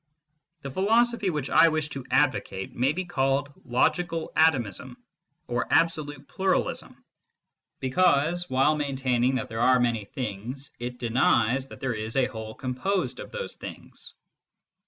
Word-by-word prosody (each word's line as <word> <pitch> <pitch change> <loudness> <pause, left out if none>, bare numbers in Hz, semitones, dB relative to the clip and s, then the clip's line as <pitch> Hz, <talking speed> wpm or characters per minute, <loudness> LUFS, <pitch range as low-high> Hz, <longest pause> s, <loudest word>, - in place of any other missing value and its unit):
The 140 - -5
philosophy 225 - +2
which 150 -5 -3
I 165 - +7
wish 155 -2 0
to 140 -2 -6
advocate 130 -8 0
may 130 +3 +2
be 185 +4 -3
called 140 -3 0
logical 165 +6 0
atomism 135 - +1 0.5
or 120 0 -2
absolute 145 -4 +1
pluralism, 190 0 -2 0.7
because, 165 +4 +2
while 135 +4 +3
maintaining 130 -3 0
that 130 +1 -2
there 115 -1 -4
are 130 +1 +5
many 115 -4 0
things, 125 +5 -5
it 125 +1 -5
denies 125 +1 +2
that - - -12
there 130 -2 -1
is 110 0 -5
a 135 -2 +4
whole 110 -3 -7
composed 155 +10 -2
of - - -8
those 485 0 -6
things. - - -10
135 Hz, 135 wpm, -26 LUFS, 125-160 Hz, 0.7 s, I